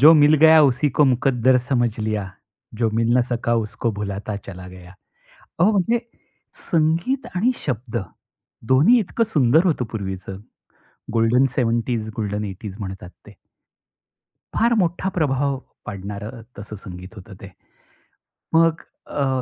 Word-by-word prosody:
जो 155 Hz, +4 st, +9 dB
मिल 150 Hz, -1 st, +6 dB
गया 160 Hz, 0 st, +8 dB
उसी 140 Hz, +1 st, +3 dB
को 150 Hz, -, +7 dB
मुकद्दर 130 Hz, -1 st, +3 dB
समझ 120 Hz, -3 st, +2 dB
लिया, 105 Hz, -3 st, -2 dB, 0.5 s
जो 115 Hz, -2 st, +2 dB
मिलना 115 Hz, +2 st, +3 dB
सका 120 Hz, -1 st, 0 dB
उसको 115 Hz, +2 st, -3 dB
भुलाता 100 Hz, +1 st, -4 dB
चला 90 Hz, -1 st, -9 dB
गया. 90 Hz, 0 st, -13 dB, 0.7 s
अहो 180 Hz, +6 st, +5 dB
म्हणजे 210 Hz, +4 st, +2 dB, 0.7 s
संगीत 165 Hz, -, +1 dB
आणि 230 Hz, +8 st, +2 dB
शब्द, 120 Hz, -3 st, -3 dB, 0.8 s
दोन्ही 165 Hz, -, +6 dB
इतकं 220 Hz, +3 st, 0 dB
सुंदर 150 Hz, +4 st, +4 dB
होतं 150 Hz, -9 st, +1 dB
पूर्वीच. 95 Hz, -3 st, -5 dB, 0.8 s
गोल्डन 115 Hz, +3 st, +3 dB
70s, 120 Hz, -1 st, 0 dB
गोल्डन 105 Hz, -1 st, -2 dB
80s 95 Hz, 0 st, -7 dB
म्हणतात 95 Hz, -3 st, -7 dB, 0.2 s
ते. -, -, -13 dB, 1.2 s
फार 235 Hz, +1 st, +3 dB
मोठा 175 Hz, 0 st, 0 dB
प्रभाव 140 Hz, -4 st, 0 dB, 0.3 s
पाडणारं 105 Hz, +4 st, -7 dB, 0.2 s
तसं 105 Hz, +1 st, -8 dB
संगीत 90 Hz, +3 st, -10 dB
होतं 100 Hz, 0 st, -11 dB
ते. 100 Hz, -, -10 dB, 1.0 s
मग 165 Hz, 0 st, +3 dB, 0.3 s
अ, 135 Hz, -3 st, -1 dB
120 Hz, 125 wpm, -22 LUFS, 105-155 Hz, 1.2 s, जो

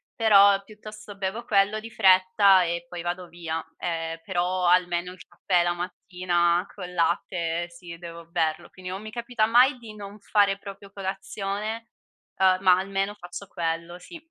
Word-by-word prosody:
però 200 Hz, -3 st, +6 dB
piuttosto 215 Hz, 0 st, -11 dB
bevo 200 Hz, +4 st, -3 dB
quello 205 Hz, 0 st, +2 dB
di 225 Hz, -, -9 dB
fretta 190 Hz, -1 st, +5 dB
e 170 Hz, 0 st, -3 dB
poi 175 Hz, -1 st, -7 dB
vado 175 Hz, +1 st, -4 dB
via, 165 Hz, -2 st, -5 dB, 0.2 s
ehm, 165 Hz, -1 st, -3 dB
però 180 Hz, 0 st, -1 dB
almeno 175 Hz, 0 st, +2 dB
il 185 Hz, -, -14 dB
caffè 180 Hz, -2 st, +1 dB
la 175 Hz, 0 st, +1 dB
mattina 175 Hz, -1 st, 0 dB
col 180 Hz, -3 st, -8 dB
latte, 170 Hz, 0 st, -1 dB
sì, 170 Hz, -1 st, -10 dB
devo 170 Hz, -1 st, -10 dB
berlo. 160 Hz, -2 st, -1 dB
Quindi 185 Hz, -1 st, -9 dB
non 190 Hz, +2 st, -5 dB
mi 215 Hz, 0 st, -8 dB
capita 235 Hz, -1 st, -1 dB
mai 250 Hz, +4 st, +5 dB
di 230 Hz, -3 st, -11 dB
non 205 Hz, 0 st, -9 dB
fare 200 Hz, -1 st, +2 dB
proprio 200 Hz, 0 st, -11 dB
colazione, 200 Hz, +3 st, -4 dB, 0.5 s
uhm, 185 Hz, -1 st, +4 dB
ma 185 Hz, -2 st, +6 dB
almeno 195 Hz, +2 st, -2 dB
faccio 190 Hz, +1 st, -9 dB
quello, 170 Hz, 0 st, -4 dB
sì. 335 Hz, -, -11 dB
185 Hz, 160 wpm, -25 LUFS, 175-205 Hz, 0.5 s, però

